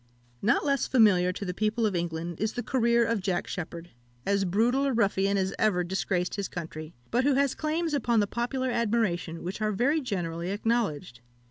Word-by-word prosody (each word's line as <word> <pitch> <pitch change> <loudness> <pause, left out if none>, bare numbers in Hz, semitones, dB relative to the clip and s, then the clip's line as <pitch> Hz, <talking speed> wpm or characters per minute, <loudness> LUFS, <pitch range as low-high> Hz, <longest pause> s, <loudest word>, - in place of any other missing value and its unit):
Not 235 - +2
less 275 -2 +1
familiar 200 -7 +4
to 200 - -6
the 180 - -3
people 215 +4 0
of 205 -3 0
England 170 0 -3
is 215 +1 -1
the 245 - -3
career 235 -2 +2
of 225 -2 0
Jack 185 -2 -1
Sheppard, 170 0 -6 0.3
as 200 0 +1
brutal 235 +9 +2
a 275 - +1
ruffian 200 -3 +2
as 190 0 0
ever 195 -5 +2
disgraced 180 0 -1
his 200 -1 -2
country, 155 -2 -7 0.2
but 240 +3 +2
who 280 0 +3
has 280 -1 +2
claims 320 +1 -1
upon 240 -5 +2
the 205 - +3
popular 245 +4 -2
admiration 210 -8 0
which 185 +5 -5
are 215 0 +1
very 270 +10 +1
generally 175 - -3
acknowledged. 200 - -1
205 Hz, 190 wpm, -28 LUFS, 180-240 Hz, 0.3 s, familiar